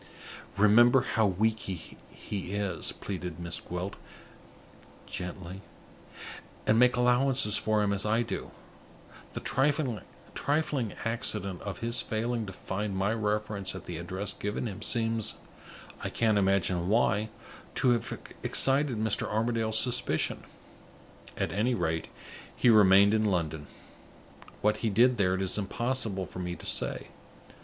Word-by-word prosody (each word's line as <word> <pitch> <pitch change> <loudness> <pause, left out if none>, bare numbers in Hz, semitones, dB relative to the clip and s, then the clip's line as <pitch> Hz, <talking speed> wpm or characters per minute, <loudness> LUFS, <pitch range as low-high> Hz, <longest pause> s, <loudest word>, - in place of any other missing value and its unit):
"Remember 120 +5 +6
how 115 -4 +1
weak 110 +4 +1
he 95 -4 -7 0.6
is," 100 -5 -1
pleaded 90 -4 -6
Miss 85 -1 -4
Gwilt, 90 +3 -5 1.1
gently, 90 +1 -6 1.0
"and 110 +1 +4
make 125 0 +5
allowances 125 -2 +3
for 110 -1 +1
him 100 -1 +1
as 100 - 0
I 110 +2 +2
do. 110 -4 -5 0.8
The - - -5
trifling 140 -1 -1
accident 105 -5 -1
of 100 -1 -6
his 115 +2 0
failing 115 0 -2
to - - -6
find 95 +1 -4
my 100 +3 +1
reference 105 -3 -2
at 95 -1 -8
the 85 -3 -5
address 95 +4 -3
given 105 +4 -3
him 105 -2 -6
seems, 115 0 +1 0.7
I - - -2
can't 110 -3 +2
imagine 95 -2 +1
why, 110 -1 +2 0.5
to 125 - +3
have 120 -3 0 0.3
excited 135 -2 +2
Mr. 110 -1 0
Armadale's 110 0 0
suspicion. 125 +1 0 0.9
At - - -1
any 110 +7 +1
rate, 80 -4 -1 0.5
he 120 - +4
remained 100 -1 +6
in 110 0 +2
London. 80 -6 -1 0.9
What 105 0 +2
he 115 - -1
did 120 +4 +4
there, 95 -2 +2
it 95 - -1
is 95 +2 +2
impossible 110 -2 -2
for 90 - -9
me 90 -1 -3
to - - -11
say. - - -1
105 Hz, 130 wpm, -29 LUFS, 95-115 Hz, 1.1 s, Remember